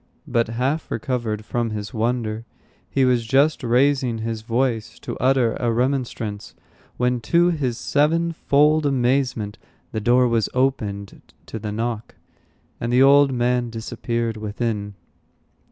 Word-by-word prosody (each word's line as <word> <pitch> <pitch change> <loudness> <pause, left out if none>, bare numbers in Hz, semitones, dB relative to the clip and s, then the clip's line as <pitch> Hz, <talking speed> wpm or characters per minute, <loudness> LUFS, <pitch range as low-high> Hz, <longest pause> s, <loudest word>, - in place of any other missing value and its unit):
But 115 -1 +1
half 130 +7 -2
recovered 115 -3 -3
from 120 0 -1
his 105 -1 -5
wonder, 115 -1 -1 0.5
he 135 -1 +2
was 125 -2 +2
just 140 +6 +2
raising 125 0 +2
his 110 0 -4
voice 115 0 -1
to - - -6
utter 130 -2 +2
a 120 -1 +1
remonstrance, 120 -4 -2 0.4
when, 125 0 +1
to 175 +8 +3
his 130 -8 -2
sevenfold 155 0 +2
amazement, 125 -5 0 0.3
the 110 - -3
door 125 +3 +4
was 115 -2 +1
opened 105 -7 -1 0.2
to 110 - -6
the 105 0 -4
knock, 115 +1 -4 0.6
and 115 - -2
the 125 +2 +5
old 140 0 +6
man 125 -1 0
disappeared 115 0 -3
within. 105 -1 -3
120 Hz, 130 wpm, -22 LUFS, 110-135 Hz, 0.6 s, old